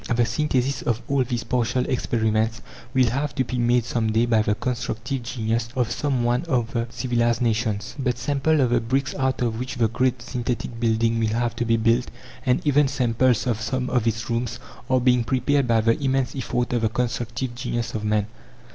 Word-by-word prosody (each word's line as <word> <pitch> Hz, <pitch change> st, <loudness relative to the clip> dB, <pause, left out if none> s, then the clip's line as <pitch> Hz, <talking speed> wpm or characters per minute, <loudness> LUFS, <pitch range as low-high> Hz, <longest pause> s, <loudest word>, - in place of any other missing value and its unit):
The 120 Hz, 0 st, +3 dB
synthesis 130 Hz, +1 st, 0 dB
of 115 Hz, -2 st, 0 dB
all 140 Hz, -1 st, +2 dB
these 120 Hz, -2 st, -3 dB
partial 120 Hz, +1 st, 0 dB
experiments 110 Hz, -2 st, 0 dB, 0.3 s
will 125 Hz, -2 st, +3 dB
have 140 Hz, +3 st, -2 dB
to 130 Hz, -, +2 dB
be 125 Hz, 0 st, -3 dB
made 120 Hz, 0 st, +2 dB
some 115 Hz, -2 st, 0 dB
day 115 Hz, +2 st, +3 dB
by 115 Hz, -2 st, +3 dB
the 105 Hz, -1 st, +1 dB
constructive 125 Hz, +2 st, -3 dB
genius 115 Hz, -1 st, -2 dB
of 125 Hz, -3 st, 0 dB
some 135 Hz, -5 st, 0 dB
one 120 Hz, +1 st, +2 dB
of 120 Hz, -8 st, 0 dB
the 115 Hz, -1 st, -1 dB
civilized 120 Hz, -2 st, 0 dB
nations. 110 Hz, -1 st, -1 dB
But 125 Hz, -3 st, 0 dB
samples 145 Hz, +3 st, +1 dB
of 125 Hz, -2 st, +2 dB
the 120 Hz, -1 st, +3 dB
bricks 135 Hz, +4 st, -1 dB
out 130 Hz, -2 st, 0 dB
of 115 Hz, -2 st, -1 dB
which 125 Hz, 0 st, -4 dB
the 115 Hz, -, +2 dB
great 125 Hz, +2 st, 0 dB
synthetic 120 Hz, -1 st, -3 dB
building 115 Hz, 0 st, +1 dB
will 110 Hz, -, +1 dB
have 120 Hz, -1 st, 0 dB
to 120 Hz, -, 0 dB
be 115 Hz, 0 st, +3 dB
built, 115 Hz, +2 st, +2 dB, 0.4 s
and 125 Hz, +4 st, +2 dB
even 145 Hz, -1 st, +4 dB
samples 125 Hz, -2 st, +1 dB
of 115 Hz, -3 st, -1 dB
some 125 Hz, +3 st, -2 dB
of 120 Hz, -3 st, +1 dB
its 115 Hz, 0 st, -1 dB
rooms, 120 Hz, 0 st, -2 dB, 0.3 s
are 130 Hz, -1 st, +4 dB
being 125 Hz, -1 st, +3 dB
prepared 130 Hz, +3 st, +1 dB
by 115 Hz, -1 st, +3 dB
the 115 Hz, +4 st, +2 dB
immense 135 Hz, -1 st, 0 dB
effort 125 Hz, -1 st, -2 dB
of 120 Hz, -, +1 dB
the 110 Hz, -, +2 dB
constructive 120 Hz, +1 st, -2 dB
genius 120 Hz, -1 st, -3 dB
of 105 Hz, -, -3 dB
man. 105 Hz, -1 st, +1 dB
120 Hz, 200 wpm, -24 LUFS, 115-130 Hz, 0.4 s, even